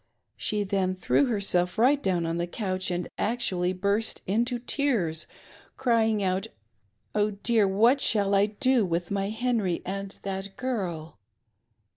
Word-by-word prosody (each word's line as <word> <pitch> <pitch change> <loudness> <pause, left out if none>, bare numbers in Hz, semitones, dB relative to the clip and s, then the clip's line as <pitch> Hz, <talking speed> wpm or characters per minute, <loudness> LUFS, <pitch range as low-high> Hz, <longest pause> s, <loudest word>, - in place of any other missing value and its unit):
She 210 -1 -1
then 190 -1 0
threw 185 +9 +2
herself 195 -5 0
right 270 +5 +4
down 180 -6 0
on 165 +1 -2
the 175 0 -1
couch 185 -1 -2
and 175 -1 -2
actually 205 -6 0
burst 200 +4 -1
into 235 +5 0
tears, 235 - 0 0.5
crying 225 -4 +2
out 190 +2 0 0.4
" - - -45
Oh 210 0 +2
dear, 225 -4 +3
what 230 +8 +4
shall 200 -2 +2
I 200 +1 +4
do 245 +3 +2
with 175 -1 -2
my 195 0 -1
Henry 220 -5 -1
and 195 +1 -5
that 195 0 -5
girl 175 - -4
200 Hz, 145 wpm, -27 LUFS, 185-230 Hz, 0.5 s, right